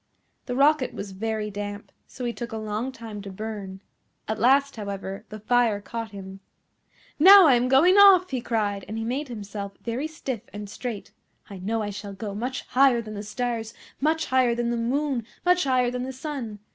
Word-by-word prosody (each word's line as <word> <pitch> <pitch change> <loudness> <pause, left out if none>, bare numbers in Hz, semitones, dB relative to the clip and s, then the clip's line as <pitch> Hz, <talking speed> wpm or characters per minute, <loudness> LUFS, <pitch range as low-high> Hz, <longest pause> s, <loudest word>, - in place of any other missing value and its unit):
The 245 - -2
Rocket 280 0 +3
was 200 -1 -6
very 215 +2 -3
damp, 205 0 -6 0.2
so 250 - -7
he 240 - -1
took 235 -1 -6
a 225 - -4
long 215 +4 -3
time 225 -4 -8
to 200 - -8
burn. 200 -1 -7 0.4
At 220 0 -2
last, 275 +4 +3
however, 200 -1 -6
the 215 - -8
fire 230 -1 +2
caught 230 +2 -6
him. 195 -1 -9 0.8
"Now 385 +3 +10
I 280 - +6
am 245 +1 +2
going 315 +9 +5
off!" 380 -4 +7
he 255 -2 -2
cried, 205 -4 -1
and 220 - -5
he 225 - -2
made 260 +6 -2
himself 205 -3 -6
very 245 +6 -2
stiff 270 -8 -5
and 205 0 -7
straight. 220 0 -6 0.4
"I 195 - -8
know 220 +4 -1
I 205 - -3
shall 200 0 -7
go 200 +1 -6
much 250 +5 -4
higher 260 -2 +4
than 215 -1 -8
the 205 - -5
stars, 225 +1 -3 0.2
much 315 +3 +1
higher 255 -2 +2
than 240 0 -1
the - - 0
moon, 260 +2 -1 0.2
much 360 -1 +3
higher 250 -2 +2
than 250 0 -3
the 260 +1 -4
sun. 260 -6 -5
230 Hz, 195 wpm, -25 LUFS, 210-260 Hz, 0.8 s, Now